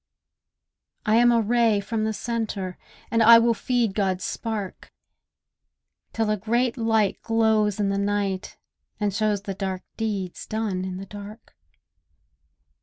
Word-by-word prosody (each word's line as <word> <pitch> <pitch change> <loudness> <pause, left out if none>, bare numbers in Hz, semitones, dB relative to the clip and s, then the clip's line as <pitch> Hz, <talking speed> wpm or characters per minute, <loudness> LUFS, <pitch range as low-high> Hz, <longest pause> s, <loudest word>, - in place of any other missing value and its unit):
I 215 +1 +4
am 240 0 +6
a 235 - +4
ray 225 -1 +2
from 215 +2 -2
the 220 - 0
centre; 215 -5 -3 0.4
And 230 0 +2
I 230 +1 +9
will 230 0 +4
feed 235 -3 0
God's 190 -3 0
spark, 215 -4 -5 1.2
Till 225 -1 0
a 215 - +1
great 235 +4 0
light 225 -4 +1
glows 220 -2 +2
in 200 -1 +1
the 200 0 0
night 200 -1 -2 0.4
and 205 -2 0
shows 210 -1 0
The 200 - -4
dark 190 -1 -4
deeds 200 -5 -3
done 215 -4 -2
in 185 -1 -5
the 195 - -7
dark. 205 +2 -11
215 Hz, 140 wpm, -24 LUFS, 195-225 Hz, 1.2 s, I